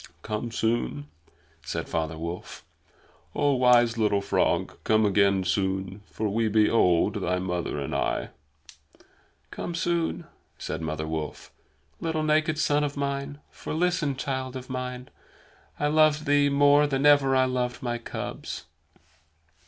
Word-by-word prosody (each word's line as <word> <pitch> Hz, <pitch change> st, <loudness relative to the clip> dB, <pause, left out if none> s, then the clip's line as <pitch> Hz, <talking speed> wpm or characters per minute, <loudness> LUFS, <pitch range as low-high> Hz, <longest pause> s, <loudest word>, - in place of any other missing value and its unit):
"Come 105 Hz, +2 st, -3 dB
soon!" 110 Hz, -11 st, -1 dB, 0.5 s
said -, -, -4 dB
Father 80 Hz, 0 st, -2 dB
Wolf. 85 Hz, +2 st, -7 dB, 0.7 s
"Oh, 145 Hz, -1 st, +2 dB
wise 120 Hz, -2 st, +4 dB
little 105 Hz, -2 st, +2 dB
frog, 100 Hz, -, 0 dB
come 110 Hz, 0 st, +3 dB
again 100 Hz, -1 st, +3 dB
soon; 95 Hz, +1 st, -1 dB
for 110 Hz, -, -3 dB
we 110 Hz, +2 st, 0 dB
be 110 Hz, 0 st, +3 dB
old, 100 Hz, 0 st, +2 dB
thy 90 Hz, 0 st, 0 dB
mother 90 Hz, -4 st, -3 dB
and 70 Hz, -, -4 dB
I." -, -, -1 dB, 1.2 s
"Come 175 Hz, -, -5 dB
soon," 170 Hz, 0 st, -1 dB, 0.3 s
said -, -, -5 dB
Mother 80 Hz, -1 st, -3 dB
Wolf, 80 Hz, -1 st, -5 dB, 0.5 s
"little 160 Hz, -1 st, -1 dB
naked 155 Hz, 0 st, +2 dB
son 150 Hz, -1 st, +2 dB
of 145 Hz, -1 st, -3 dB
mine. 140 Hz, +1 st, -3 dB
For, -, -, -6 dB
listen, 170 Hz, -4 st, +1 dB
child 130 Hz, -1 st, -3 dB
of 130 Hz, 0 st, -7 dB
man, 125 Hz, 0 st, -5 dB, 0.7 s
I 150 Hz, -, 0 dB
loved 155 Hz, 0 st, +3 dB
thee 145 Hz, -1 st, +3 dB
more 145 Hz, +1 st, +5 dB
than 135 Hz, 0 st, 0 dB
ever 145 Hz, -2 st, +5 dB
I 130 Hz, 0 st, +4 dB
loved 125 Hz, -1 st, -2 dB
my 120 Hz, -1 st, -2 dB
cubs." 115 Hz, -, -6 dB
125 Hz, 135 wpm, -26 LUFS, 100-145 Hz, 1.2 s, more